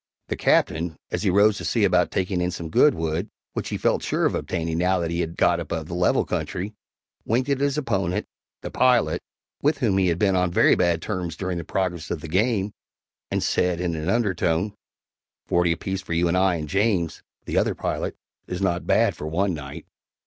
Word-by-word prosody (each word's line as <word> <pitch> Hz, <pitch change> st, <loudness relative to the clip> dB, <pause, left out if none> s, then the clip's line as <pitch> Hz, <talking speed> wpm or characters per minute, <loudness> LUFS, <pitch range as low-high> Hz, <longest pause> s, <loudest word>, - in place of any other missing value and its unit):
The -, -, -1 dB
Captain, 80 Hz, +1 st, +1 dB
as -, -, -1 dB
he 100 Hz, -, +2 dB
rose 100 Hz, +3 st, +4 dB
to -, -, -6 dB
see 115 Hz, -, +1 dB
about 90 Hz, -3 st, +3 dB
taking 95 Hz, -1 st, -1 dB
in 90 Hz, -, +1 dB
some 85 Hz, -2 st, -6 dB
good 150 Hz, -, +5 dB
wood, 80 Hz, +5 st, -2 dB, 0.2 s
which -, -, -3 dB
he -, -, -2 dB
felt -, -, +1 dB
sure -, -, 0 dB
of -, -, +2 dB
obtaining 80 Hz, -2 st, -2 dB
now 90 Hz, +1 st, +2 dB
that 85 Hz, -2 st, -2 dB
he 85 Hz, -, -1 dB
had 85 Hz, -1 st, -3 dB
got 85 Hz, -1 st, +3 dB
above 80 Hz, -1 st, -4 dB
the 85 Hz, -, -7 dB
level 90 Hz, 0 st, +2 dB
country, 100 Hz, +4 st, -3 dB, 0.5 s
winked 125 Hz, +5 st, 0 dB
at 140 Hz, -, +1 dB
his 140 Hz, 0 st, +1 dB
opponent, 100 Hz, -, -1 dB, 0.4 s
the -, -, -5 dB
pilot, 125 Hz, -2 st, +3 dB, 0.4 s
with 150 Hz, +1 st, +2 dB
whom 110 Hz, -8 st, +2 dB
he 95 Hz, -, +3 dB
had 85 Hz, -2 st, +1 dB
been 95 Hz, 0 st, +2 dB
on 90 Hz, -1 st, +2 dB
very -, -, +5 dB
bad 85 Hz, -2 st, +1 dB
terms 85 Hz, -3 st, -3 dB
during 95 Hz, -2 st, -2 dB
the -, -, -5 dB
progress 90 Hz, -1 st, -2 dB
of 80 Hz, -, -3 dB
the 80 Hz, -, -7 dB
game, 100 Hz, +3 st, +1 dB, 0.6 s
and -, -, -1 dB
said, 90 Hz, -2 st, +1 dB
in 90 Hz, -1 st, -1 dB
an 80 Hz, +2 st, -3 dB
undertone, 95 Hz, -3 st, +1 dB, 0.7 s
"Forty 85 Hz, -1 st, +2 dB
apiece 95 Hz, +3 st, -2 dB
for 90 Hz, -, -5 dB
you 85 Hz, +1 st, +2 dB
and 85 Hz, -, +1 dB
I 95 Hz, -1 st, +3 dB
and 75 Hz, -2 st, -4 dB
James 95 Hz, -3 st, 0 dB, 0.2 s
(the -, -, +1 dB
other -, -, 0 dB
pilot) -, -, -3 dB, 0.3 s
is 90 Hz, -, -4 dB
not 90 Hz, -3 st, -1 dB
bad -, -, +3 dB
for 75 Hz, -, -6 dB
one 90 Hz, +4 st, 0 dB
night." 70 Hz, -3 st, -7 dB
90 Hz, 210 wpm, -24 LUFS, 85-100 Hz, 0.7 s, good